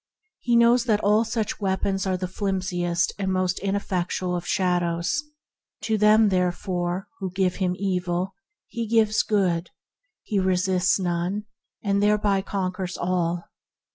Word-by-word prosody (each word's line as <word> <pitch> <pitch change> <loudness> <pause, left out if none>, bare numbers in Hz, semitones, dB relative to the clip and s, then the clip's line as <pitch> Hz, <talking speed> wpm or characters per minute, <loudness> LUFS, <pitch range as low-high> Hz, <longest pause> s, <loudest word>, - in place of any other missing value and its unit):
He 240 -1 +1
knows 235 +1 +5
that 215 -4 +2
all 210 +2 +4
such 225 -2 -2
weapons 195 -1 -1
are 185 -1 0
the 185 0 -3
flimsiest 180 -3 -1
and 190 -1 -1
most 185 -1 0
ineffectual 185 -2 -1
of 175 - -4
shadows. 175 +6 0 0.6
To 220 - +1
them, 215 +1 +5
therefore, 180 0 -1
who 190 -2 -3
give 185 0 0
him 180 -2 0
evil 180 -1 -1 0.3
he 235 -2 -4
gives 220 -1 +3
good. 185 -5 0 0.5
He 205 - -1
resists 185 0 +2
none, 180 +3 -1 0.4
and 200 -1 +1
thereby 205 -1 +2
conquers 185 -2 -3
all. 175 -1 -1
190 Hz, 135 wpm, -24 LUFS, 180-205 Hz, 0.6 s, knows